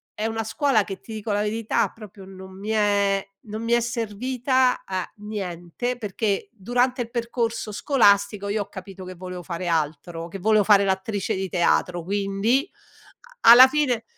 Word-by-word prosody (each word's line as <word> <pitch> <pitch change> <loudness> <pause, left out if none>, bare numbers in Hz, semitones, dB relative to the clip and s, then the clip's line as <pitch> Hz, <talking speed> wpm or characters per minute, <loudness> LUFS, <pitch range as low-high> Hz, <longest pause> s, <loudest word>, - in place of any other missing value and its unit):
è 215 - -3
una 225 0 -2
scuola 225 -1 +1
che, 195 -1 -7
ti 225 - -10
dico 215 0 -4
la 205 0 +1
verità, 215 +1 0
proprio 210 -3 -12
non 190 0 -12
mi 210 +2 -6
è 200 -2 +2 0.2
non 215 +1 -6
mi 230 - -2
è 240 - +5
servita 250 +3 0
a 185 -2 -3
niente, 205 +3 -5
perché 205 -1 -2
durante 245 +4 0
il 235 - -4
percorso 235 -2 -2
scolastico 200 -5 +2
io 210 0 0
ho - - -20
capito 190 0 -10
che 185 - -7
volevo 180 0 -8
fare 175 0 -5
altro, 165 +1 -2
che 195 +3 -8
volevo 215 +1 +3
fare 200 -2 +6
l'attrice 190 +1 -1
di 190 -1 -3
teatro, 175 -1 +1
quindi, 200 - 0 0.8
a - - +11
alla 255 +2 +10
fine 260 -6 0
205 Hz, 170 wpm, -24 LUFS, 190-230 Hz, 0.8 s, a